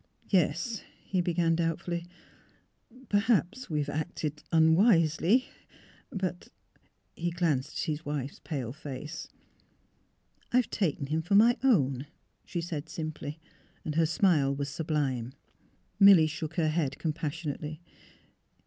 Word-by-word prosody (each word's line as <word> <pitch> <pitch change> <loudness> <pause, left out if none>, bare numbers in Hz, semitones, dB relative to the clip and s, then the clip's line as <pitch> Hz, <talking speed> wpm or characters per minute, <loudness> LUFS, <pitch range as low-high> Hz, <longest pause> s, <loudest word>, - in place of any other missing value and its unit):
'' - - -30
Yes," 180 +8 -1 0.2
he 185 -2 0
began, 170 -1 +1
doubtfully; 170 +1 -2 0.5
" 255 +1 -23
perhaps 210 - +1
we 155 - -1
have 145 - -3
acted 155 -1 -3
unwisely; 165 - +4 0.6
but 185 -2 -3 0.3
" - - -37 0.3
He 175 +1 -1
glanced 155 -5 0
at - - -1
his 155 0 -3
wife's 145 -2 -4
pale 130 -7 -4
face. 150 +2 -7 0.6
" - - -39
I - - +5
have 250 - +1
taken 155 -8 0
him 155 +3 -1
for 175 +5 +1
my 230 +4 +6
own," 140 - +2 0.4
she 170 - -4
said, 160 -2 -5
simply. 155 -1 -5 0.5
Her 165 +1 +3
smile 155 -5 +3
was 140 0 -3
sublime. 140 -5 -2 0.7
Milly 195 -5 +8
shook 155 +1 -4
her 160 -2 +2
head 150 -4 -1
compassionately. 155 -1 -4
160 Hz, 130 wpm, -29 LUFS, 150-175 Hz, 0.7 s, Milly